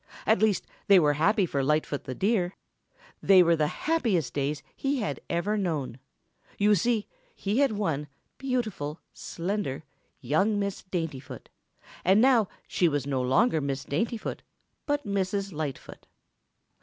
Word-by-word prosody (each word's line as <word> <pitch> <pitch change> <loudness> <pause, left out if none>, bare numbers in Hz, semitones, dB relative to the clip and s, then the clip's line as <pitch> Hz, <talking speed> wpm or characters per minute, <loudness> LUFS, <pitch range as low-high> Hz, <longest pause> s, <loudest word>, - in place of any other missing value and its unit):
At 220 -2 +4
least, 215 -3 +2 0.2
they 200 - +8
were 150 -4 +4
happy 195 - +2
for 140 -5 -1
Lightfoot 150 0 0
the 130 - -5
Deer. 195 - +1 0.7
They 190 -2 +7
were 170 0 +4
the 155 -2 +1
happiest 200 - 0
days 145 +1 -2
he 275 +1 -1
had 215 - -2
ever 190 +5 0
known. 150 - -2 0.6
You 210 +1 +4
see, 215 +3 +1 0.3
he 210 +5 -1
had 275 -5 +3
won 160 -8 -1 0.3
beautiful, 220 - -2
slender, 175 -5 -3 0.4
young 175 - +1
Miss 200 -1 -2
Daintyfoot, 165 -8 -5 0.5
and 190 +3 +5
now 240 -4 +5 0.2
she 175 - +2
was 145 -4 -1
no 135 -2 -1
longer 160 - +2
Miss 140 -1 -3
Daintyfoot 225 +9 -2 0.5
but 290 -2 0
Mrs. 200 -1 -1
Lightfoot. 150 -3 -6
185 Hz, 140 wpm, -27 LUFS, 150-215 Hz, 0.7 s, they